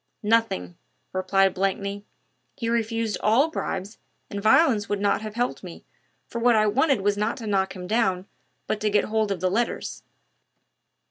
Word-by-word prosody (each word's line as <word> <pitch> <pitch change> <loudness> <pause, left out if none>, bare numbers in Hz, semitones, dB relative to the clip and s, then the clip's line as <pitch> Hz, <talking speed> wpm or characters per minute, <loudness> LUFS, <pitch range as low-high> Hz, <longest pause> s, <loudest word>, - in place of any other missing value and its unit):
"Nothing," 210 - +1 0.4
replied 190 0 +2
Blakeney. 200 +1 -2 0.5
"He 230 -4 -3
refused 225 -2 -1
all 260 +9 +3
bribes, 200 - -4 0.3
and 200 - -4
violence 220 -1 +4
would 205 - -1
not 200 0 +1
have 215 -1 -7
helped 245 +1 -2
me, - - -10 0.4
for 235 - -5
what 240 0 +4
I 215 0 +4
wanted 265 +2 +2
was 205 +1 +1
not 210 +2 -1
to 235 - -7
knock 195 -2 0
him 180 -1 -7
down, 190 -3 +1 0.4
but 215 - -2
to 215 - +1
get 205 0 +3
hold 220 -1 0
of 185 -3 -3
the 185 0 +1
letters." 235 +4 -2
210 Hz, 170 wpm, -25 LUFS, 195-230 Hz, 0.5 s, violence